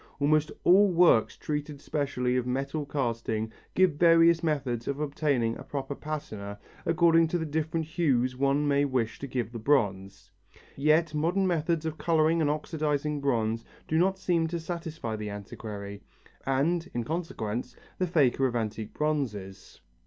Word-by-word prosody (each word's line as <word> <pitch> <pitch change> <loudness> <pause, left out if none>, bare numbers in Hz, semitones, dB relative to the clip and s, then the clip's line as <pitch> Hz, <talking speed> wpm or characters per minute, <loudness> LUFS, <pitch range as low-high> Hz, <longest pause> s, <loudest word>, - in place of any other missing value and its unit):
Almost 155 +2 +2
all 195 +2 +6
works 170 -10 +4
treating 150 -1 -4
specially 135 -4 -1
of 125 -1 0
metal 140 +3 -2
casting 115 -5 -2 0.2
give 185 -1 +5
various 165 0 +5
methods 135 -7 -1
for 140 +2 -2
obtaining 140 -6 0
a - - -8
proper 140 -1 -4
patina 110 -10 -6 0.3
according 165 0 +4
to 175 - -1
the 160 - -2
different 160 +1 -2
hues 135 -6 +1
one 140 +2 +1
may 140 0 +3
wish 130 -5 -1
to 140 - -5
give 125 -4 -3
the 120 - -6
bronze. 95 -7 0 0.4
Yet 155 +3 +2
modern 170 +6 +1
methods 165 -2 0
of 160 -1 -4
colouring 160 0 +2
and 150 - +2
oxidizing 150 -1 -1
bronze 115 -4 0 0.2
do 160 - +1
not 190 +2 +2
seem 170 -3 +1
to 170 +1 -3
satisfy 165 -8 -5
the 105 0 -5
antiquary 100 0 -7 0.5
and, 165 +6 +1
in 120 - 0
consequence, 125 -6 -4 0.2
the 185 - +1
faker 135 -5 +3
of 120 - -4
antique 110 -1 -3
bronzes. 115 -11 -3
145 Hz, 155 wpm, -28 LUFS, 120-160 Hz, 0.5 s, all